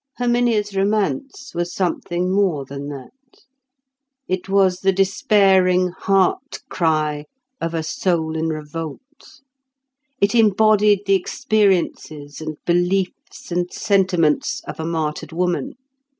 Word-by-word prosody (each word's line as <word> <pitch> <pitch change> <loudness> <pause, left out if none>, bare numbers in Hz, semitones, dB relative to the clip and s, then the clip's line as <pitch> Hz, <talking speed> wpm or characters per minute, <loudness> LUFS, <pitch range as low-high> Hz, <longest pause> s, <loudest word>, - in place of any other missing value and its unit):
Herminia's 240 -4 +1
romance 215 +8 -1
was 175 0 -2
something 180 0 -1
more 185 -9 +1
than 140 +1 -7
that. 135 -3 -9 1.2
It 185 +1 -3
was 190 -2 +3
the 195 0 +2
despairing 190 -1 +3
heart 190 +1 0
cry 155 -3 0 0.4
of 165 0 -2
a 160 - -1
soul 160 -1 -1
in 160 0 -1
revolt. 165 - -8 0.8
It 200 +2 +2
embodied 210 -2 +4
the 195 - +2
experiences 190 - 0
and 155 -1 -5
beliefs 175 +1 -1
and 175 +1 -1
sentiments 180 -6 +1
of - - -8
a 160 - -3
martyred 160 -2 -3
woman. 180 - -1
185 Hz, 110 wpm, -20 LUFS, 160-200 Hz, 1.2 s, embodied